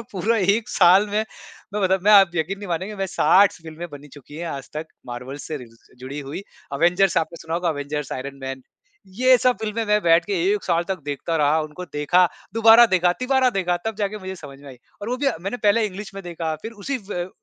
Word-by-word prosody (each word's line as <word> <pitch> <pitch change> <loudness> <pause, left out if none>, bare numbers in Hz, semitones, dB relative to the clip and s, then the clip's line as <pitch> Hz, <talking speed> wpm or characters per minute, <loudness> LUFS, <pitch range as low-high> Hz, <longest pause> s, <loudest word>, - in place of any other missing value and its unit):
पूरा 215 +5 0
1 200 +3 +1
साल 190 +3 +5
में - - -10 0.6
मैं 210 - -1
मतलब 190 -1 +2
मैं 210 - +4
आप 195 -3 +7
यकीन 175 +5 -2
नहीं 205 -2 -8
मानेंगे 185 +5 -3
मैं 195 0 -2
60 195 +2 +4
स - - -13
फ़िल्में 160 +2 -8
बनी 145 0 -11
चुकी 145 +1 -15
हैं 170 +1 -5
आज 135 -3 -6
तक 155 +1 -4 0.2
मार्वल 125 +3 -7
से 155 - -4
रिज़ 120 -4 -12 0.2
जुड़ी 135 +3 -7
हुई। 145 +8 -7 0.3
अवेंजर्स 175 +5 +2
आपने 170 +1 -3
सुना 160 0 -4
होगा 175 0 0
अवेंजर्स, 145 -1 -3
आयरन 140 +2 -6
मैन 130 0 -5 0.4
ये 250 +7 +4
सब 250 +1 +2
फ़िल्में 220 +1 -2
मैं 210 0 +3
बैठ 165 0 +4
के 205 - -4 0.2
1 210 - -2
साल 170 -1 +1
तक 190 -3 -3
देखता 145 +3 -3
रहा। 150 +1 +3
उनको 155 +4 -8
देखा, 160 +5 +3 0.3
दोबारा 225 +1 +7
देखा, 180 -3 +2
तीबारा 260 0 +2
देखा 185 -5 0
तब 220 -2 -3
जाके 210 +1 -2
मुझे 190 -1 -6
समझ 140 -4 -11
में 145 - -12
आई 130 - -11 0.3
और 215 - -4
वो 250 - -1
भी 280 - -2
अ, 275 - +2
मैंने 195 +7 -4
पहले 215 0 +2
इंग्लिश 195 0 -8
में 195 - -7
देखा 165 -2 -3
फिर 225 - -6
उसी 255 +6 -4
व 175 -1 -3
180 Hz, 230 wpm, -22 LUFS, 155-205 Hz, 0.6 s, आप